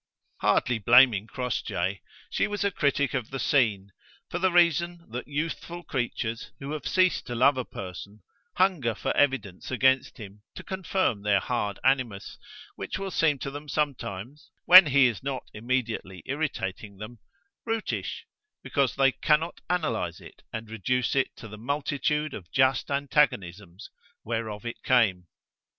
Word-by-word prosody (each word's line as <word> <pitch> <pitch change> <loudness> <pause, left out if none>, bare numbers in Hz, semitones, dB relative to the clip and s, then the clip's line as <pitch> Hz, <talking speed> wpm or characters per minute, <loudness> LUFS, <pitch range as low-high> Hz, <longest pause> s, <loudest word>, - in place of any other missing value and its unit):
Hardly 120 -2 +2
blaming 115 -2 +5
Crossjay, 100 -6 -2 0.3
she - - +1
was 205 -1 -2
a 200 - +1
critic 140 -4 +1
of 125 -5 -2
the 135 - -4
scene, 110 -8 +1 0.4
for 175 - -2
the 185 0 +2
reason 170 0 +2
that 125 +2 -5
youthful 165 +4 -4
creatures 120 -4 -3
who 140 +1 -6
have 155 -1 -4
ceased 185 -1 +2
to 120 - -4
love 130 +4 +4
a 130 - -2
person, 100 +2 -9 0.3
hunger 170 - +2
for - - -2
evidence 130 -10 0
against 130 0 +2
him 105 -2 -11
to - - -8
confirm 185 - -1
their 100 -1 +3
hard 105 -4 -2
animus, 130 -7 0 0.4
which - - -5
will 195 0 -4
seem 155 -5 +2
to 135 +1 -5
them 145 +1 -8
sometimes, 135 -3 -3 0.2
when 185 -2 +10
he 140 -1 +5
is 115 -5 0
not 135 -2 -4
immediately 115 -5 -3
irritating 110 -9 -4
them, 110 +3 -9 0.4
brutish, 225 -1 -3 0.4
because 140 -4 0
they 135 0 +4
can 150 +3 +3
not 165 +2 -7
analyze 115 - -1
it - - -14
and 110 0 -6
reduce 125 +4 0
it 135 - +2
to 115 - -10
the 105 0 -10
multitude 145 +3 -1
of 90 -3 -9
just 130 -2 +2
antagonisms 105 - -1 0.3
whereof 110 -1 -4
it 120 - -6
came. 100 -9 +2
130 Hz, 150 wpm, -27 LUFS, 110-150 Hz, 0.4 s, when